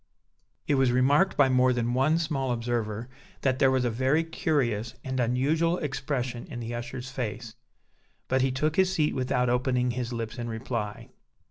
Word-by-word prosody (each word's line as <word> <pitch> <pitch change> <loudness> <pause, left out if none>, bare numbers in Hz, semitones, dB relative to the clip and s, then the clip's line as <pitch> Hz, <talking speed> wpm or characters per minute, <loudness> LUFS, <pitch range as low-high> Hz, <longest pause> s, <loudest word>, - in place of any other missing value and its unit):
It - - +1
was 130 -2 +3
remarked 140 +9 +3
by 145 - +6
more 130 0 +4
than 120 0 -1
one 135 +6 +3
small 145 -6 -1
observer 115 -2 -2 0.3
that 130 -1 +1
there 135 - +5
was 130 -1 +1
a 120 - +1
very 130 +7 +2
curious 130 - -1
and 130 -1 -3
unusual 145 +8 +1
expression 135 -5 -3
in 125 -5 -7
the 120 0 -5
usher's 120 +2 -6
face; 115 -3 -4 0.7
but 130 0 +2
he 135 0 +2
took 150 +4 -1
his 190 -1 +4
seat 155 -5 +1
without 130 -1 0
opening 125 0 +1
his 125 0 -3
lips 115 -1 -4
in 120 - -3
reply. 110 -2 -4
130 Hz, 170 wpm, -27 LUFS, 120-140 Hz, 0.7 s, by